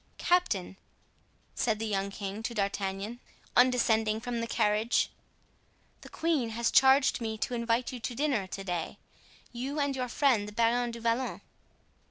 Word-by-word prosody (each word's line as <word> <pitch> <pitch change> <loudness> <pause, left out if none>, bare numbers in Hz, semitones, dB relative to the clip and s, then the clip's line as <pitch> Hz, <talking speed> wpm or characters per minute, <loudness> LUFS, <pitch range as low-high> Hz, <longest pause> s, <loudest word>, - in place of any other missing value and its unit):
"Captain," 210 - +1 0.8
said 220 -3 0
the 225 - -3
young 200 -2 -1
king 200 +1 -5
to 235 +1 -4
D'Artagnan, 200 +2 -2 0.4
on 250 +1 +7
descending 220 -3 +1
from 240 0 -3
the 230 - -3
carriage, 215 +1 +1 0.9
"the - - -12
queen 315 -8 0
has 230 +1 0
charged 265 -1 +5
me 220 -1 -3
to 245 - -3
invite 235 +1 0
you 250 - -6
to 240 +1 -4
dinner 260 -8 0
to 195 +1 -6
day—you 240 - -6
and 285 -1 0
your 255 -1 -2
friend 240 -5 +2
the 210 - -9
Baron 235 +2 +2
du 235 0 -7
Vallon." 230 +3 -1
230 Hz, 155 wpm, -30 LUFS, 210-250 Hz, 0.9 s, on